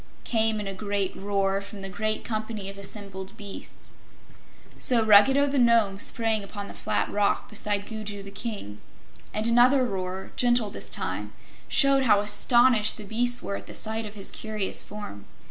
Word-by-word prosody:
came 220 Hz, -2 st, +1 dB
in 205 Hz, -, -4 dB
a 195 Hz, -, -4 dB
great 200 Hz, -1 st, -2 dB
roar 195 Hz, 0 st, -1 dB
from 200 Hz, 0 st, -10 dB
the -, -, -2 dB
great 215 Hz, +2 st, -2 dB
company 215 Hz, -2 st, -4 dB
of 195 Hz, -, -14 dB
assembled 195 Hz, -1 st, -6 dB
beasts. 200 Hz, -2 st, -9 dB, 0.9 s
So 235 Hz, -3 st, +4 dB
Ruggedo 220 Hz, +7 st, +6 dB
the 280 Hz, -1 st, 0 dB
Nome 230 Hz, -5 st, +3 dB
sprang 220 Hz, -1 st, 0 dB
upon 200 Hz, 0 st, -7 dB
the -, -, -9 dB
flat -, -, -1 dB
rock 205 Hz, -1 st, +1 dB
beside 205 Hz, -1 st, -2 dB
Gugu 210 Hz, -2 st, -6 dB
the 200 Hz, -, -9 dB
King, 200 Hz, -, -6 dB, 0.5 s
and 215 Hz, +1 st, -2 dB
another 250 Hz, +3 st, +5 dB
roar, 190 Hz, -3 st, -4 dB
gentle 240 Hz, -4 st, +2 dB
this -, -, -5 dB
time, -, -, -3 dB, 0.3 s
showed 275 Hz, -1 st, +4 dB
how 210 Hz, -4 st, +5 dB
astonished 215 Hz, +2 st, +4 dB
the 215 Hz, -, -8 dB
beasts 240 Hz, +4 st, +1 dB
were 200 Hz, -, -3 dB
at -, -, -12 dB
the -, -, -8 dB
sight 220 Hz, 0 st, 0 dB
of 205 Hz, -, -11 dB
his 200 Hz, -2 st, -5 dB
curious 215 Hz, -3 st, -3 dB
form. 205 Hz, -, -9 dB
210 Hz, 170 wpm, -26 LUFS, 200-230 Hz, 0.9 s, Ruggedo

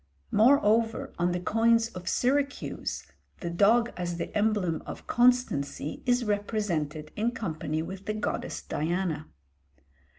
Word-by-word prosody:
Moreover, 225 Hz, -1 st, +3 dB
on 175 Hz, +1 st, +2 dB
the 175 Hz, -, -1 dB
coins 225 Hz, +4 st, +3 dB
of 180 Hz, -4 st, -6 dB
Syracuse 280 Hz, +3 st, -1 dB, 0.4 s
the 170 Hz, -2 st, -3 dB
dog 225 Hz, +7 st, +4 dB
as 175 Hz, -1 st, -3 dB
the -, -, -5 dB
emblem 205 Hz, -6 st, +1 dB
of -, -, -7 dB
constancy 240 Hz, -, +1 dB
is 245 Hz, -1 st, +3 dB
represented 190 Hz, -8 st, -2 dB
in 220 Hz, +3 st, +1 dB
company 160 Hz, -7 st, -3 dB
with 190 Hz, +3 st, -8 dB
the 215 Hz, -, -1 dB
goddess 215 Hz, -, -3 dB
Diana. 160 Hz, 0 st, -2 dB
205 Hz, 125 wpm, -28 LUFS, 170-230 Hz, 0.4 s, dog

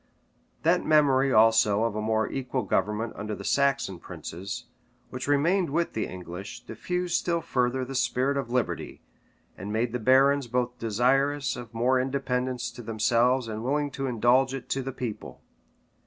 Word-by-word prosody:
That 170 Hz, +3 st, +3 dB
memory 140 Hz, -3 st, +4 dB
also 110 Hz, -2 st, +4 dB
of 115 Hz, -2 st, -1 dB
a 110 Hz, -, -2 dB
more 110 Hz, 0 st, +1 dB
equal 130 Hz, -1 st, -3 dB
government 105 Hz, +4 st, -1 dB
under 105 Hz, +1 st, -4 dB
the -, -, -9 dB
Saxon 120 Hz, -10 st, +1 dB
princes, 90 Hz, +4 st, -7 dB, 0.5 s
which 125 Hz, +1 st, -5 dB
remained 165 Hz, +6 st, +2 dB
with 170 Hz, +4 st, -1 dB
the 110 Hz, -, -2 dB
English, 90 Hz, +2 st, -8 dB
diffused 180 Hz, +10 st, -3 dB
still 170 Hz, -1 st, +1 dB
further 130 Hz, -5 st, 0 dB
the 135 Hz, -, -7 dB
spirit 130 Hz, +1 st, +1 dB
of 135 Hz, -4 st, -2 dB
liberty, 125 Hz, 0 st, -2 dB, 0.5 s
and 100 Hz, +3 st, -6 dB
made 115 Hz, +2 st, -1 dB
the 125 Hz, -, -1 dB
barons 135 Hz, +3 st, +4 dB
both 125 Hz, +1 st, -2 dB
desirous 130 Hz, +5 st, +1 dB
of 120 Hz, -3 st, -9 dB
more 125 Hz, +3 st, +2 dB
independence 125 Hz, -2 st, -2 dB
to 120 Hz, -, -10 dB
themselves 115 Hz, +3 st, +1 dB
and 110 Hz, 0 st, -5 dB
willing 145 Hz, +3 st, 0 dB
to 135 Hz, 0 st, -3 dB
indulge 125 Hz, +2 st, +2 dB
it 135 Hz, -, -8 dB
to 135 Hz, -, -1 dB
the 135 Hz, +1 st, -4 dB
people. 125 Hz, -4 st, -6 dB
125 Hz, 160 wpm, -27 LUFS, 110-135 Hz, 0.5 s, memory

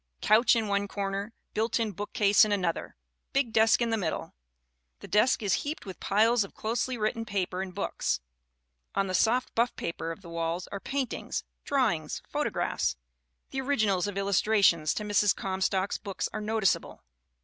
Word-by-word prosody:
Couch 220 Hz, +3 st, +5 dB
in 225 Hz, -2 st, 0 dB
one 200 Hz, 0 st, 0 dB
corner, 200 Hz, +1 st, -3 dB, 0.2 s
built 220 Hz, +2 st, 0 dB
in 225 Hz, -2 st, 0 dB
bookcase 205 Hz, +1 st, +3 dB
in 215 Hz, -, +1 dB
an 200 Hz, -3 st, +1 dB
other, 170 Hz, -, -2 dB, 0.4 s
big 270 Hz, -5 st, +1 dB
desk 225 Hz, +2 st, +5 dB
in 230 Hz, -, -1 dB
the 225 Hz, -, +2 dB
middle. 175 Hz, -6 st, -3 dB, 0.7 s
The -, -, -10 dB
desk 215 Hz, +3 st, +3 dB
is 195 Hz, -3 st, +2 dB
heaped 300 Hz, +2 st, -5 dB
with 190 Hz, -2 st, -8 dB
piles 225 Hz, +3 st, +3 dB
of 195 Hz, -, -11 dB
closely 240 Hz, +3 st, -1 dB
written 220 Hz, +1 st, -1 dB
paper 190 Hz, -3 st, -2 dB
and 190 Hz, -1 st, -5 dB
books. 195 Hz, +2 st, -1 dB, 0.8 s
On 195 Hz, -, +2 dB
the 185 Hz, -, -4 dB
soft 240 Hz, +6 st, +2 dB
buff 235 Hz, +1 st, +1 dB
paper 165 Hz, 0 st, -4 dB
of 165 Hz, -, -8 dB
the 170 Hz, -, -10 dB
walls 170 Hz, +1 st, -2 dB
are 200 Hz, -, -4 dB
paintings, 270 Hz, +4 st, -3 dB, 0.2 s
drawings, 230 Hz, -, 0 dB
photographs -, -, -1 dB, 0.6 s
the 265 Hz, -, -2 dB
originals 215 Hz, -9 st, +1 dB
of 200 Hz, -1 st, -4 dB
illustrations 195 Hz, -5 st, +3 dB
to 210 Hz, -, -2 dB
Mrs. 205 Hz, -1 st, +3 dB
Comstock's 190 Hz, 0 st, -1 dB
books 200 Hz, -2 st, -3 dB
are 215 Hz, -, -3 dB
noticeable. 215 Hz, -2 st, 0 dB
205 Hz, 170 wpm, -29 LUFS, 190-225 Hz, 0.8 s, Couch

